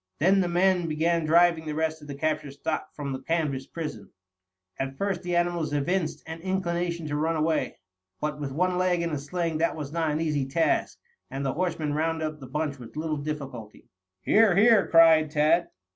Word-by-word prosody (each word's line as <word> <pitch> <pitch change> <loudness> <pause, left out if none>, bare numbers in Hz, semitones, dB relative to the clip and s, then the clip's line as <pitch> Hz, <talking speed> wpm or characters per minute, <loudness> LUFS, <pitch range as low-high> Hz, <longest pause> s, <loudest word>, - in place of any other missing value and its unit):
Then 190 +6 +4
the 180 - +1
men 180 0 +2
began 165 +1 +1
driving 165 0 +4
the 150 - -3
rest 160 0 -1
of 150 - -12
the 140 - -6
captured 150 -1 -2
stock 155 +2 -4
from 140 -2 -4
the 130 - -4
canvas 145 -3 -1
prison. 150 - -6 0.7
At 135 0 -3
first 195 -3 -1
the 175 -1 -2
animals 175 -3 0
evinced 165 +4 -1
an 160 +1 -7
inclination 175 -2 -2
to 145 -1 -3
run 160 +2 0
away. 155 0 0 0.4
But 150 -1 -3
with 140 -2 -4
one 180 +5 0
leg 180 -2 +1
in 170 - -2
a 150 - -2
sling 165 +2 -2
this 165 - +1
was 150 -3 -6
not 165 -1 0
an 150 +1 -1
easy 150 -4 0
task, 160 +5 0 0.3
and 135 +1 -4
the 135 - 0
horsemen 160 -4 -1
rounded 160 +1 -1
up 155 -1 -5
the 130 - -10
bunch 145 0 -3
with 120 -2 -11
little 155 -1 -2
difficulty. 140 -7 -7 0.3
"Here, 215 -4 +4
here!" 215 0 +5
cried 160 -2 +6
Tad. 155 +3 +2
160 Hz, 195 wpm, -26 LUFS, 150-170 Hz, 0.7 s, cried